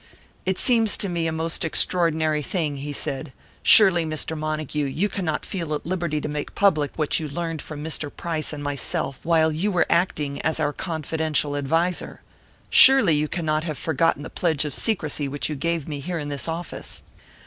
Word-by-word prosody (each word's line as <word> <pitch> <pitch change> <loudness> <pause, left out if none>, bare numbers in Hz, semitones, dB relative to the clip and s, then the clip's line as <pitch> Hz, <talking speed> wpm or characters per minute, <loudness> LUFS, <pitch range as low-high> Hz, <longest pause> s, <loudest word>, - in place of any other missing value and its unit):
"It 190 0 0
seems 225 -4 +4
to 200 - 0
me 170 -2 -1
a - - -1
most 160 +1 -1
extraordinary 160 -2 +1
thing," 150 -2 -2
he 145 +2 -5
said. 140 0 -2 0.3
"Surely, 190 -6 +7
Mr. 155 0 -2
Montague, 155 -1 -3
you 165 +9 -1
cannot 175 -7 -3
feel 165 -6 -3
at 150 - -7
liberty 170 -3 -2
to - - -4
make 150 0 -5
public 155 -8 +2
what 155 -2 +1
you 155 -2 -5
learned 165 +1 -4
from 150 -1 -8
Mr. 155 -1 -2
Price 160 +1 -4
and 145 -1 -6
myself 140 -1 -3
while 160 -1 +3
you 175 +7 -1
were 175 -2 +2
acting 150 -5 0
as 155 +1 0
our 150 -1 0
confidential 160 -3 -2
adviser! 165 +6 -1 0.5
Surely 260 -10 +8
you 150 +1 +1
cannot 155 -2 -1
have 155 -4 -4
forgotten 165 0 0
the - - -8
pledge 160 -4 0
of 150 - -4
secrecy 155 -9 -1
which 145 +2 -2
you 150 - -3
gave 165 +1 -2
me 150 -2 -5
here 170 +5 -4
in 145 -2 -5
this 140 +1 -3
office!" 165 +1 -5
155 Hz, 185 wpm, -23 LUFS, 150-170 Hz, 0.5 s, Surely